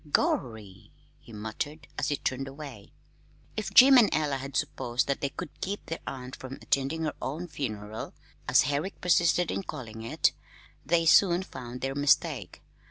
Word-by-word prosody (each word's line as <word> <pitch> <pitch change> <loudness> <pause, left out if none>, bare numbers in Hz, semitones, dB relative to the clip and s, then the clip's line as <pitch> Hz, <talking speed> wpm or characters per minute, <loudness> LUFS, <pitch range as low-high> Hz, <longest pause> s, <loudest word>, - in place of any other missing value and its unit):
"Gorry!" 110 -10 -1 0.3
he - - -16
muttered, 115 +8 -5
as - - -1
he 145 - +1
turned 135 +1 -2
away. 135 -6 -10 0.6
If 215 - -3
Jim 265 0 +9
and 220 - +5
Ella 150 -3 +1
had 135 +1 -4
supposed 125 0 -1
that 140 - -2
they 140 - 0
could 150 +3 -8
keep 200 +2 -3
their 165 - -4
aunt 130 -1 -6
from 130 0 -8
attending 140 +5 -1
her 155 - -1
own 160 +7 -4
"funeral" 110 -8 -5 0.3
as - - +5
Herrick 145 +8 -2
persisted 175 0 +3
in - - -2
calling 115 - -7
it 115 - +2 0.5
they 165 +3 +2
soon 175 +2 +5
found 125 -7 -8
their 135 0 -1
mistake. 145 0 +1
140 Hz, 165 wpm, -28 LUFS, 125-165 Hz, 0.6 s, Jim